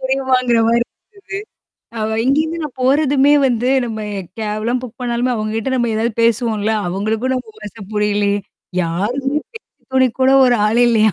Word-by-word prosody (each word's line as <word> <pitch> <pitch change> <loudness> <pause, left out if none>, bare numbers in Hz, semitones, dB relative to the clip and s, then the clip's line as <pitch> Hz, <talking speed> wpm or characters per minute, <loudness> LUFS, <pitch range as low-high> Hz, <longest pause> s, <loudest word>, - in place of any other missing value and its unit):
புரியுமாங்கிற 260 -2 +1
மாரி 235 +1 +3
இருந்தது. - - +1 1.2
அவ 220 +1 -1
இங்கேருந்து 310 +5 +1
நான் 265 -3 -8
போறதுமே 280 +1 +3
வந்து 245 0 0 0.2
நம்ம 220 -2 -5 0.4
கேப்லாம் 220 +3 -1
புக் 250 0 -10
பண்ணாலுமே 240 +1 0
அவங்ககிட்ட 220 +3 -2
நம்ம 240 -2 0
ஏதாவது 225 +1 0
பேசுவோம்ல, 225 -2 +1 0.2
அவங்களுக்கும் 220 +7 -1
நம்ம 230 -4 -6
பாஷ 210 +1 -9 0.2
புரியலே. 205 -1 +1 0.5
யாரும் 240 - -1 0.2
பேச்சுதுணை 260 - -1
கூட 260 - +5 0.2
ஒரு 245 -1 +3
ஆள் 235 +3 +3
இல்லையா? 220 -3 +3
235 Hz, 140 wpm, -18 LUFS, 215-260 Hz, 1.2 s, கூட